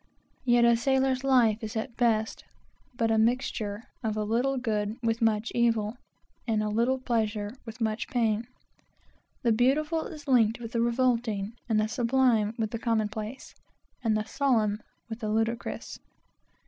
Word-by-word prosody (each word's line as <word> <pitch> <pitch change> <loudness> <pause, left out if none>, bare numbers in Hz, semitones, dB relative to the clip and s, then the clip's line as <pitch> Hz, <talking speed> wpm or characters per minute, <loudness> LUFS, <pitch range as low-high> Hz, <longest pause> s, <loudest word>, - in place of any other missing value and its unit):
Yet 240 -1 +5
a 235 0 +6
sailor's 265 +1 +1
life 245 -5 +3
is 215 0 -5
at 230 +2 -4
best, 220 -3 +1 0.5
but 230 -2 +1
a 220 - +3
mixture 220 -2 0 0.2
of 215 -2 -2
a 215 - 0
little 245 +6 0
good 215 -4 -1
with 230 0 0
much 225 0 +1
evil, 230 -2 +1 0.5
and 215 -2 +1
a 210 - -1
little 235 +5 +1
pleasure 220 -4 -1
with 225 +2 -8
much 220 -1 -1
pain. 225 -2 0 1.0
The 235 - +3
beautiful 300 +8 +2
is 300 -3 -10
linked 230 -4 +3
with 230 -1 -7
the 235 -2 0
revolting, 235 -4 0 0.2
the 215 -1 +3
sublime 230 -2 +2
with 220 -2 -2
the 230 - -3
commonplace, 220 +1 -2 0.5
and 220 -2 +2
the 215 - -2
solemn 220 -7 +1 0.3
with 225 -1 -6
the 215 -3 -3
ludicrous. 225 +2 -2
230 Hz, 150 wpm, -28 LUFS, 215-245 Hz, 1.0 s, a